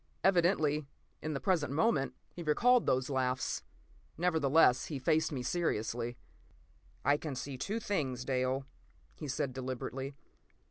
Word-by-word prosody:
Evidently, 165 -6 +3 0.3
in 155 -1 -3
the - - -1
present 160 -8 +1
moment, 145 -2 +1 0.2
he 175 - -7
recalled 235 +11 +4
those 130 0 +2
laughs. 130 -2 0 0.6
Nevertheless, 160 -6 +4
he 150 - -4
faced 155 +5 +2
me 130 -4 -3
seriously. 120 -6 -1 0.9
"I 145 +1 +5
can 150 -2 -5
see 135 +2 -5
two 200 - -2
things, 135 - -2
Dale," 130 0 0 0.5
he 150 - -7
said 130 -1 -1
deliberately. 130 +1 -4
140 Hz, 130 wpm, -33 LUFS, 130-160 Hz, 0.9 s, I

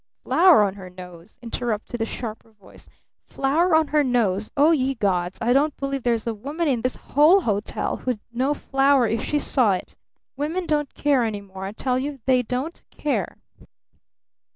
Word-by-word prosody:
"Flour 345 - +5
on 195 -2 0
her 190 -2 -10
nose?" 180 0 -13
interrupted 230 -1 -4
the 225 - 0
sharper 225 -1 -7
voice. 205 -2 -14 0.4
"Flour 315 +6 +1
on 315 -1 +3
her 300 -1 +3
nose? 220 -6 0
Oh, 295 +4 +5
ye 270 -4 +1
gods! 185 -5 -1
I 240 +2 +2
don't 290 +2 +2
believe 275 0 -3
there's 235 -2 0
a 230 - -1
woman 290 +10 -3
in 250 -5 +1
this 255 +2 -1
whole 315 +8 +4
hotel 210 - -2
who'd 250 -4 -3
know 265 +5 0
flour 270 -2 +2
if 225 +1 -1
she 300 - -1
saw 250 -7 +3
it! 185 - -6 0.4
Women 320 +6 -2
don't 295 -3 0
care 280 -4 +2
any 215 -3 -3
more, 190 -1 -9
I 195 - -4
tell 250 +4 -1
you! 280 +1 -4
They 255 -1 +3
don't 255 +7 -4
care!" 295 - -3
255 Hz, 175 wpm, -23 LUFS, 215-290 Hz, 0.4 s, Flour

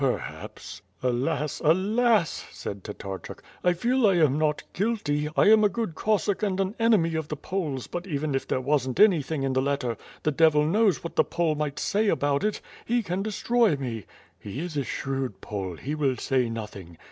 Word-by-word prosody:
"Perhaps 135 -3 -4
" - - -32
"Alas! 130 +4 -1
Alas!" 205 +4 +2
said 100 -1 -7
Tatarchuk. 95 -2 -7 0.2
"I 180 - +4
feel 240 +6 +2
I 195 - +4
am 155 -5 +4
not 150 -1 +1
guilty, 165 -9 0
I - - +6
am 220 -1 +6
a 210 - +5
good 225 -4 -3
Cossack 205 +2 0
and 195 -3 0
an 195 +1 0
enemy 215 -8 +3
of 160 -2 -2
the 150 - -3
Poles 150 -6 -3
but 175 +2 -6
even 150 -3 -2
if 135 - -1
there 130 - 0
wasn't 130 -2 0
anything 160 -8 +4
in 135 -1 0
the 130 - +2
letter, 135 -4 -1 0.3
the 155 - +2
devil 150 0 +4
knows 200 +1 +2
what 170 - -6
the - - +6
Pole 170 -2 0
might 150 -1 -3
say 210 +2 +1
about 145 -6 +1
it. 210 0 -1 0.2
He 240 0 0
can 185 0 -2
destroy 220 -1 +2
me." 120 -7 -5 0.3
"He 105 +8 -6
is 175 -2 -5
a 140 - 0
shrewd 135 -3 -3
Pole; 95 -4 -5
he 145 - -4
will 140 -4 0
say 130 -3 +1
nothing." 100 -7 -7
155 Hz, 195 wpm, -26 LUFS, 135-195 Hz, 0.3 s, I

